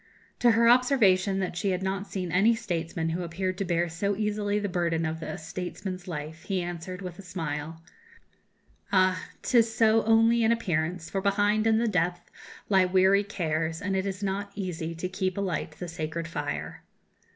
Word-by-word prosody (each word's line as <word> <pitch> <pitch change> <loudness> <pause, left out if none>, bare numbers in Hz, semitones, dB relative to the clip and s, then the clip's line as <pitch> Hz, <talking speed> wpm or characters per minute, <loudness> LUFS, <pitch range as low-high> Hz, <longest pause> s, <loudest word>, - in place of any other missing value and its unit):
To 245 - +5
her 230 +1 +4
observation 220 -7 +4
that 185 -2 -3
she 195 +3 -1
had 185 0 -1
not 195 +1 -2
seen 180 -3 -4
any 205 +7 +4
statesman 170 -6 -3
who 170 +2 -2
appeared 185 +2 -2
to 195 - 0
bear 175 -1 +1
so 195 +5 -1
easily 210 0 -1
the 205 -1 -1
burden 170 -3 0
of 160 +1 -3
a - - -5
statesman's 185 +3 -6
life, 160 -1 -6
he 190 -3 -1
answered, 175 +2 -6
with 180 -1 -7
a - - -6
smile: 165 -3 -5 1.1
"Ah! 185 -1 +3 0.2
'tis 230 -2 +3
so 225 0 +4
only 225 +1 +4
in 225 0 +4
appearance; 175 -6 -1
for 195 +4 -2
behind, 205 +2 +2
in 220 0 +4
the 235 +1 +1
depth, 180 -3 -1 0.4
lie 190 -2 +4
weary 190 +2 +4
cares, 165 -4 -2
and 195 0 -2
it 190 +1 0
is 195 +1 -4
not 200 +1 -2
easy 170 -4 -4
to 170 +3 -3
keep 185 0 -2
alight 185 -5 -2
the 175 +3 -7
sacred 165 0 -4
fire." 150 -3 -4
185 Hz, 180 wpm, -27 LUFS, 170-205 Hz, 1.1 s, To